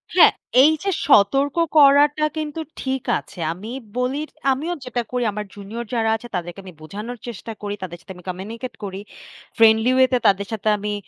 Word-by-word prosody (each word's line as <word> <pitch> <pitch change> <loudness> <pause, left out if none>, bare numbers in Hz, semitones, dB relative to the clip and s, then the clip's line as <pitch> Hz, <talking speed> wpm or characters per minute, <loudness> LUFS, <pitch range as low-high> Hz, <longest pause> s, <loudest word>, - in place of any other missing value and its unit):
হ্যাঁ, - - +8 0.3
এইযে 315 +6 +3 0.2
সতর্ক 275 +5 +4 0.2
করাটা 290 +1 +6
কিন্তু 310 +1 -4 0.2
ঠিক 265 -1 -2 0.2
আছে। 180 - -15
আমি 205 +6 -9 0.3
বলি 255 +3 0 0.3
আমিও 310 +7 -1
যেটা 245 -1 -2
করি 250 -1 -1
আমার 210 +1 -5
জুনিয়র 215 +4 -7
যারা 225 -1 +1
আছে 240 +2 -8
তাদেরকে 175 +2 -5
আমি 185 -2 -11
বোঝানোর 210 +9 -7
চেষ্টা 230 0 -7
করি, 205 0 -3
তাদের 175 -1 -6
সাথে 190 - -10
আমি 180 - -14
কমিউনিকেট 225 +7 -6
করি। 195 0 -5 0.6
ফ্রেন্ডলি 225 +2 +5
ওয়েতে 260 -1 +4
তাদের 200 0 +2
সাথে 215 0 -4
আমি 210 +1 -3
230 Hz, 170 wpm, -22 LUFS, 200-265 Hz, 0.6 s, হ্যাঁ